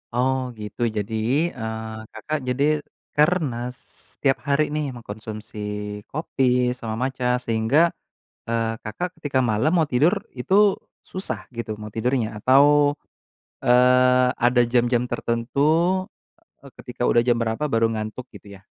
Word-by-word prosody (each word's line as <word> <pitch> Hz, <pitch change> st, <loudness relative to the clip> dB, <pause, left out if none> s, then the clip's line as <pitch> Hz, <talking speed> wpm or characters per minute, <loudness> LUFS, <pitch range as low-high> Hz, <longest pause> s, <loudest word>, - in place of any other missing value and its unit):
Oh 130 Hz, +1 st, +2 dB, 0.2 s
gitu. 105 Hz, +3 st, -8 dB, 0.2 s
Jadi, 105 Hz, +2 st, -3 dB, 0.4 s
eee, 110 Hz, 0 st, -5 dB
Kakak 155 Hz, -1 st, -3 dB
jadi 130 Hz, +3 st, 0 dB, 0.5 s
karena 150 Hz, -5 st, +2 dB, 0.2 s
se -, -, -12 dB
setiap 135 Hz, -2 st, +1 dB
hari 140 Hz, +2 st, +3 dB
nih 150 Hz, -1 st, -1 dB
mengkonsumsi 110 Hz, -1 st, -8 dB, 0.5 s
kopi 145 Hz, -2 st, -3 dB, 0.4 s
sama 110 Hz, -1 st, -4 dB
matcha 130 Hz, -1 st, -2 dB, 0.2 s
sehingga, 115 Hz, +6 st, +2 dB, 0.7 s
eee, 115 Hz, -1 st, 0 dB, 0.2 s
Kakak 120 Hz, +12 st, -4 dB
ketika 140 Hz, -3 st, 0 dB
malam 110 Hz, +9 st, +2 dB
mau 160 Hz, -, +3 dB
tidur 150 Hz, +10 st, +4 dB, 0.2 s
itu 185 Hz, +10 st, -1 dB, 0.6 s
susah 185 Hz, +1 st, -3 dB, 0.2 s
gitu 115 Hz, -2 st, -4 dB
mau 105 Hz, 0 st, -7 dB
tidurnya? 120 Hz, 0 st, 0 dB
Atau, 130 Hz, +5 st, +5 dB, 1.0 s
eee, 125 Hz, +1 st, +5 dB, 0.2 s
ada 120 Hz, 0 st, +4 dB
jam-jam 120 Hz, 0 st, +3 dB
tertentu, 115 Hz, +4 st, -2 dB, 1.0 s
eee, -, -, -14 dB
ketika -, -, -10 dB
udah 120 Hz, -, +4 dB
jam 120 Hz, -1 st, +3 dB
berapa 115 Hz, +5 st, -2 dB
baru 115 Hz, 0 st, +3 dB
ngantuk 110 Hz, +3 st, -5 dB
gitu -, -, -13 dB
ya? 95 Hz, -, -24 dB
125 Hz, 130 wpm, -23 LUFS, 110-135 Hz, 1.0 s, Atau